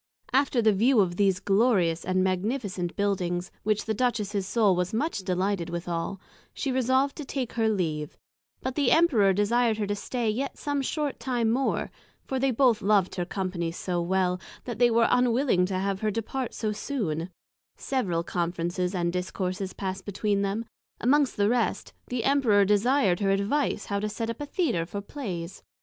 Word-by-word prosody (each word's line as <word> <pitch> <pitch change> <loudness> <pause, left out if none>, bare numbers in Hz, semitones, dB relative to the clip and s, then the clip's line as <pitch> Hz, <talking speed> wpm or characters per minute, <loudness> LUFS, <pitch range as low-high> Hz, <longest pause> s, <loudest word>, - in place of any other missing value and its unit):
After 265 -3 +3
the 215 -1 +5
view 230 +5 +4
of 180 -3 +2
these 195 -2 +3
Glorious 195 -6 +2
and 185 0 +1
Magnificent 190 -1 -2
Buildings, 180 -3 -1
which 215 0 0
the 220 - 0
Duchess's 210 -4 -1
Soul 210 -4 +3
was 180 +4 -1
much 285 -1 -1
delighted 185 -1 -1
withall, 170 +2 -3 0.4
she 275 - -2
resolved 260 +2 +2
to 300 - -5
take 265 -3 -4
her 225 -1 +1
leave; 155 -7 -2 0.4
but 260 - -3
the 280 -2 +2
Emperor 270 - +4
desired 220 +3 +2
her 210 - -1
to 205 - -1
stay 235 +3 -3
yet 255 +6 -2
some 285 -1 -1
short 290 +1 -2
time 240 -4 0
more, 265 +3 0 0.3
for 265 - -2
they 270 +1 +2
both 250 -2 +3
loved 200 -2 +2
her 180 -2 -2
company 180 -3 -3
so 175 +1 -2
well, 180 0 0 0.2
that 240 -3 -6
they 245 -1 +6
were 230 0 +4
unwilling 245 -6 +3
to 190 -1 -2
have 195 0 -1
her 215 - 0
depart 230 +4 -3
so 215 -2 -1
soon: 200 - -3 0.5
several 185 -11 -1
Conferences 175 +2 -2
and 175 -1 0
Discourses 185 +1 -3
pass'd 190 -1 -4
between 205 0 -1
them; 200 +3 -1 0.3
amongst 280 +2 +2
the 205 0 +3
rest, 235 0 0
the 245 -2 -2
Emperor 240 -8 +4
desir'd 205 -1 +3
her 200 -2 +1
advice 200 +9 0
how 200 -1 -1
to 210 +1 -2
set 225 +2 -3
up 230 - -8
a 290 - -4
Theatre 285 - 0
for 200 +3 -5
Plays. 195 -7 -6
205 Hz, 175 wpm, -27 LUFS, 185-245 Hz, 0.5 s, they